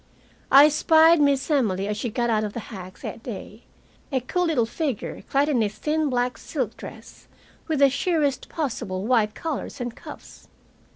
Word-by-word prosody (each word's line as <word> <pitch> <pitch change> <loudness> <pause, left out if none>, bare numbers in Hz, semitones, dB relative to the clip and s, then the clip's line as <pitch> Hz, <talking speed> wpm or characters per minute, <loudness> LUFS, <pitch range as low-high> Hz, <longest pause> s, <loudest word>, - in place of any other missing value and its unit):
I 280 +2 +9
spied 320 +1 +5
Miss 280 +1 +2
Emily 200 -9 +1
as 210 - -2
she 230 +3 -3
got 240 +1 -1
out 215 -1 +1
of 210 -1 -4
the - - -4
hack 185 -1 -9
that - - -6
day, 220 -1 -8 0.5
a 265 - +1
cool 355 +9 -1
little 295 -9 +2
figure 270 -1 -4
clad 280 +1 +2
in 270 -6 +2
a 210 - +1
thin 300 +8 -1
black 250 -1 -1
silk - - -3
dress, - - -12 0.4
with 315 -2 0
the 280 0 +6
sheerest 290 -3 0
possible 205 - -3
white 220 -3 +2
collars 320 -4 -5
and 240 -1 -4
cuffs. - - -12
255 Hz, 175 wpm, -24 LUFS, 215-300 Hz, 0.5 s, I